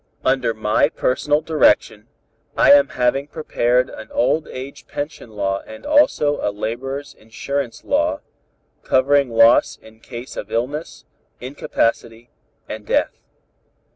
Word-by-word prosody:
"Under 130 Hz, -4 st, +1 dB
my 110 Hz, -1 st, +2 dB
personal 145 Hz, +4 st, 0 dB
direction, 110 Hz, -9 st, +2 dB, 0.5 s
I -, -, +6 dB
am 140 Hz, -1 st, +7 dB
having 135 Hz, 0 st, 0 dB
prepared 125 Hz, -5 st, 0 dB
an 110 Hz, -3 st, -10 dB
old 150 Hz, +5 st, +1 dB
age 130 Hz, +2 st, -9 dB
pension 145 Hz, -4 st, -6 dB
law 100 Hz, -2 st, -2 dB
and 110 Hz, -, -11 dB
also 290 Hz, -, +3 dB
a -, -, 0 dB
laborers' 125 Hz, +7 st, -5 dB
insurance 115 Hz, +2 st, -5 dB
law, 300 Hz, +1 st, 0 dB, 0.6 s
covering 140 Hz, 0 st, +2 dB
loss 115 Hz, 0 st, +4 dB
in 110 Hz, 0 st, -18 dB
cases 120 Hz, +2 st, -9 dB
of 105 Hz, -, -6 dB
illness, 130 Hz, +8 st, -4 dB, 0.3 s
incapacity 115 Hz, -3 st, -2 dB, 0.4 s
and 110 Hz, -, -7 dB
death. -, -, 0 dB
125 Hz, 120 wpm, -20 LUFS, 115-145 Hz, 0.6 s, am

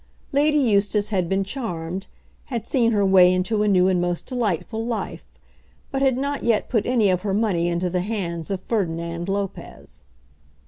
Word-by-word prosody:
Lady 300 Hz, +2 st, +3 dB
Eustace 205 Hz, -5 st, +2 dB
had 185 Hz, -5 st, 0 dB
been 195 Hz, 0 st, +1 dB
charmed, 190 Hz, -5 st, -5 dB, 0.4 s
had 235 Hz, -5 st, -4 dB
seen 235 Hz, -3 st, +2 dB
her 205 Hz, -3 st, +2 dB
way 185 Hz, -2 st, +6 dB
into 190 Hz, +4 st, 0 dB
a 210 Hz, -, +2 dB
new 185 Hz, -2 st, +4 dB
and 185 Hz, -2 st, +2 dB
most 175 Hz, -1 st, -2 dB
delightful 225 Hz, -, -2 dB
life, 230 Hz, -1 st, -4 dB, 0.6 s
but 270 Hz, -, -2 dB
had 265 Hz, -2 st, +3 dB
not 280 Hz, +1 st, -2 dB
yet 230 Hz, -3 st, +1 dB
put 225 Hz, -5 st, 0 dB
any 230 Hz, -6 st, +3 dB
of 180 Hz, -1 st, 0 dB
her 200 Hz, -2 st, -1 dB
money 195 Hz, -6 st, +1 dB
into 175 Hz, +1 st, 0 dB
the 180 Hz, 0 st, -1 dB
hands 175 Hz, -5 st, -3 dB
of 195 Hz, -2 st, -2 dB
Ferdinand 170 Hz, -4 st, -2 dB
Lopez. 195 Hz, -, -5 dB
200 Hz, 175 wpm, -23 LUFS, 180-230 Hz, 0.6 s, way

